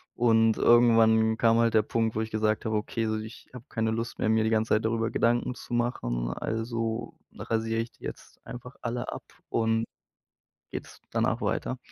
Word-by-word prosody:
Und 115 -2 +4
irgendwann 115 -2 +5
kam 115 0 +4
halt 115 -1 +3
der 110 - +5
Punkt, 115 +1 -1
wo 110 - 0
ich 110 - -4
gesagt 110 0 0
habe: 110 -2 0
„Okay, 115 +1 -2
so, 110 0 0
ich 110 +1 -9
habe 125 -1 -10
keine 110 -1 -1
Lust 115 +1 -3
mehr, - - +1
mir 110 0 +3
die - - +2
ganze 110 0 +1
Zeit 110 +1 0
darüber 115 0 0
Gedanken 120 +1 +1
zu 120 - -9
machen. - - -1
Also 115 0 -3 0.2
rasiere 115 0 -1
ich 115 - -6
die - - -24
jetzt - - -9
einfach 125 +2 -9
alle 120 0 -3
ab - - -7 0.3
und 115 0 +1 0.9
geht's - - -8
danach - - 0
weiter.“ - - -1
115 Hz, 185 wpm, -28 LUFS, 110-115 Hz, 0.9 s, irgendwann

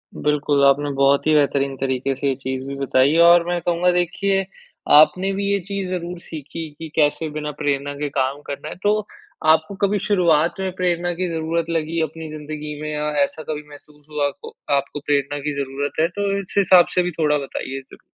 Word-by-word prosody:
बिल्कुल, 145 -1 +1
आपने 145 +1 +3
बहुत 140 +2 +3
ही 155 - +4
बेहतरीन 140 -2 +2
तरीक़े 135 0 -1
से 140 +1 -2
ये 135 - +1
चीज़ 130 0 -4
भी 140 - -5
बताई 135 0 +2
है 165 +1 +4
और 170 0 +6
मैं 175 0 0
कहूँगा, 175 +1 +2
देखिए 195 +2 +1 0.5
आपने 155 +6 +6
भी 200 +1 -2
ये 200 - +2
चीज़ 200 -2 -3
ज़रूर 180 -1 -4
सीखी, 160 0 -7
कि 160 -1 -7
कैसे 155 +1 +1
बिना 150 0 -4
प्रेरणा 145 0 -1
के 145 0 -3
काम 135 +1 -1
करना 140 0 -5
है। - - -7
तो 210 +1 +3 0.5
आपको 160 +5 +3
कभी 205 0 0
शुरुआत 175 -4 +2
में 190 -1 -2
प्रेरणा 175 -1 0
की 180 - 0
ज़रूरत 165 +1 -2
लगी 165 0 -1
अपनी 160 0 -4
ज़िंदगी 150 0 -7
में 155 - -4
या 150 0 -2 0.2
ऐसा 155 +2 -4
कभी 150 -1 -3
महसूस 150 0 -16
हुआ, 150 -1 0
आपको 140 - -9 0.2
आपको 140 +1 -2
प्रेरणा 145 0 0
की 150 - -1
ज़रूरत 140 +3 -4
है, 165 - +4
तो 200 +2 -2
इस 190 - -12
हिसाब 185 -2 +6
से 180 - +4
भी 180 - -2
थोड़ा 150 -2 +3
बताइए 135 -1 -5
ज़रूर। - - -15
155 Hz, 200 wpm, -21 LUFS, 145-175 Hz, 0.5 s, और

